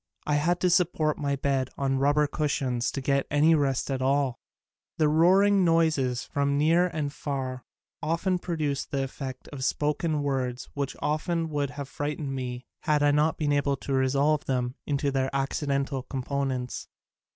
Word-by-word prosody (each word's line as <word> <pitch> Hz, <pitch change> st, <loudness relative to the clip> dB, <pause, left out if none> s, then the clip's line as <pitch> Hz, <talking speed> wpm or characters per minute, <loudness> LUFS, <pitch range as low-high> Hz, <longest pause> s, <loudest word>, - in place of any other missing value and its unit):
I 150 Hz, -, 0 dB
had 165 Hz, +4 st, +2 dB
to 180 Hz, -, +3 dB
support 160 Hz, -3 st, +2 dB
my 140 Hz, -1 st, 0 dB
bed 135 Hz, -2 st, 0 dB
on 135 Hz, -1 st, 0 dB
rubber 145 Hz, +2 st, +3 dB
cushions 135 Hz, -5 st, -1 dB
to 140 Hz, -, -3 dB
get 140 Hz, 0 st, +1 dB
any 150 Hz, +3 st, +4 dB
rest 140 Hz, -3 st, +1 dB
at 130 Hz, -1 st, -1 dB
all. 135 Hz, -1 st, +1 dB, 0.6 s
The 155 Hz, -, +3 dB
roaring 190 Hz, +6 st, +5 dB
noises 155 Hz, -7 st, +2 dB
from 140 Hz, 0 st, 0 dB
near 165 Hz, +4 st, +4 dB
and 150 Hz, -4 st, -3 dB
far 130 Hz, -4 st, -4 dB, 0.4 s
often 175 Hz, +4 st, 0 dB
produced 155 Hz, -6 st, -2 dB
the 135 Hz, -1 st, -1 dB
effect 130 Hz, -1 st, -6 dB
of 140 Hz, -3 st, -6 dB
spoken 150 Hz, +2 st, 0 dB
words 130 Hz, -3 st, -2 dB
which 140 Hz, -1 st, -3 dB
would 155 Hz, -2 st, -1 dB
have 140 Hz, +1 st, -6 dB
frightened 145 Hz, -1 st, -3 dB
me 125 Hz, -1 st, -4 dB
had 150 Hz, -2 st, +1 dB
I 145 Hz, -, +5 dB
not 150 Hz, +2 st, +2 dB
been 150 Hz, -2 st, 0 dB
able 140 Hz, -1 st, +1 dB
to 135 Hz, -, -4 dB
resolve 140 Hz, +3 st, +2 dB
them 125 Hz, -2 st, -1 dB
into 145 Hz, -1 st, 0 dB
their 135 Hz, -1 st, 0 dB
accidental 140 Hz, 0 st, -1 dB
components. 130 Hz, -1 st, -3 dB
140 Hz, 160 wpm, -27 LUFS, 135-155 Hz, 0.6 s, roaring